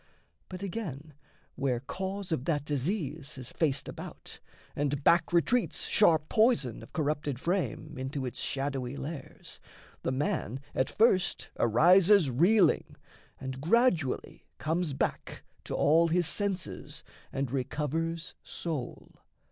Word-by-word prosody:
But, 185 +1 -7
again, 160 - -5 0.4
where 130 -3 0
cause 190 +8 -5
Of 140 -5 -1
that 145 -4 0
disease 150 0 -2
has 130 -2 -9
faced 145 -4 0
about, - - -9 0.4
and 145 0 -1
back 170 +3 +4
Retreats 210 +8 +1
sharp 160 -7 +4
poison 220 - +2
of - - -13
corrupted 150 -3 -1
frame 170 - -2
Into 135 +1 -3
its 125 - -5
shadowy 135 -1 -2
lairs, 150 0 -7 0.4
the - - -1
man 130 -2 -1
at 130 - +1
first 195 -5 +2
Arises 175 - +5
reeling, 175 - +3 0.4
and 130 0 -6
gradually 175 - +1
comes 165 -1 -1
back - - -3 0.2
To - - -3
all 165 +3 +4
his 175 +1 +2
senses 185 - -3 0.3
and 135 -2 -2
recovers 155 +5 -2
soul. 155 -8 -5
155 Hz, 120 wpm, -30 LUFS, 135-180 Hz, 0.4 s, Arises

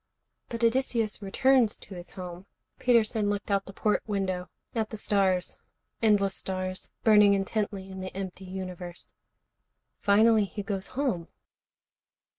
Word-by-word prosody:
"But 235 0 -4
Odysseus 230 -3 +1
returns 240 +3 +3
to - - -12
his 175 -1 -8
home." 180 -1 -8 0.3
Peterson 225 -3 +3
looked 205 0 -2
out 195 0 +2
the - - -7
port 210 +2 +1
window, 185 -4 -2 0.2
at 220 -2 -1
the 220 - -6
stars, 190 -3 +1 0.4
endless 205 -3 +3
stars, 185 -1 -3
burning 210 -2 +7
intently 195 0 -2
in 190 - -7
the 185 0 -6
empty 190 -1 -6
universe. 185 -2 -7 0.9
"Finally 215 +1 +5
he 205 +1 -6
goes 195 -1 -3
home." 235 -13 0
200 Hz, 130 wpm, -28 LUFS, 190-220 Hz, 0.9 s, burning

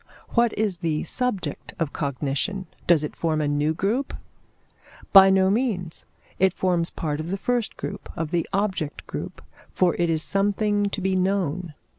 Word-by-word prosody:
What 235 -1 +3
is 205 -4 +1
the 160 -3 -1
subject 250 +1 -2
of 165 -5 -2
cognition? 145 - -2 0.2
Does 165 -3 +5
it 150 - -5
form 160 -2 0
a 150 - 0
new 145 +2 +1
group? 225 - -1 1.0
By 195 -1 +10
no 190 0 +4
means; 200 -8 -2 0.3
it 190 -1 +3
forms 175 -2 +1
part 150 -2 -3
of 155 +2 -4
the 195 - -1
first 240 +2 -1
group, - - -6
of 165 -2 -3
the 170 -2 -1
object 190 -6 -2
group; - - -7 0.3
for 180 -2 +2
it 170 -1 +2
is 160 -1 +1
something 205 +1 +1
to 200 - -4
be 190 0 +1
known. 185 -4 -1
185 Hz, 165 wpm, -24 LUFS, 160-200 Hz, 1.0 s, By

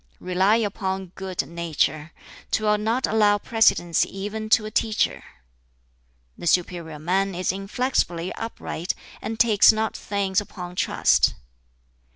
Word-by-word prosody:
"Rely 185 +4 +2
upon 190 -4 -2
good 190 -2 -4
nature. 160 -2 -1 0.4
'Twill 210 -1 +1
not 225 +5 0
allow 210 -1 +3
precedence 205 -6 +2
even 210 +3 -5
to 215 0 +4
a 215 - -6
teacher. 220 -1 0 1.1
"The - - -7
superior 170 -2 0
man 185 +5 0
is 180 0 0
inflexibly 195 -3 -1
upright, 205 -6 -4 0.3
and 225 0 -5
takes 220 -3 +6
not 220 0 -2
things 200 -1 -1
upon 180 -3 -9
trust. - - +2
195 Hz, 120 wpm, -24 LUFS, 180-215 Hz, 1.1 s, takes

